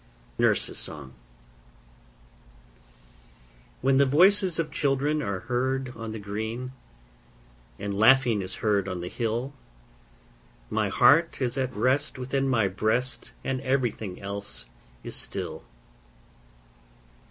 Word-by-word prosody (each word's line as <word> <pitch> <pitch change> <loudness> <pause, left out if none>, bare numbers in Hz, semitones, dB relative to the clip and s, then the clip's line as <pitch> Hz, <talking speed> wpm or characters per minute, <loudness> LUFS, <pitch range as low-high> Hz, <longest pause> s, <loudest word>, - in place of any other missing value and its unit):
NURSE'S - - +1
SONG 70 -3 -8 2.7
When 135 +1 +5
voices 180 +6 +4
of 160 -2 -1
children 145 +2 +1
are 100 -8 -3
heard 130 0 -1
on 115 -1 -6
the 110 - -5
green, 110 +5 -4 1.1
And 100 0 -4
laughing 120 +1 +5
is 95 - -6
heard 100 -3 +1
on 90 -2 -3
the 90 - -5
hill, 120 +4 -2 1.2
My - - +1
heart 165 +4 +5
is 125 -2 -1
at 130 -2 -2
rest 135 +4 +1
within 135 +1 -1
my 110 -6 +3
breast, 110 +7 -1
And 130 -1 -2
everything 125 -8 -1
else 100 -12 -7 0.4
is - - -6
still. - - -5
125 Hz, 105 wpm, -27 LUFS, 105-135 Hz, 2.7 s, When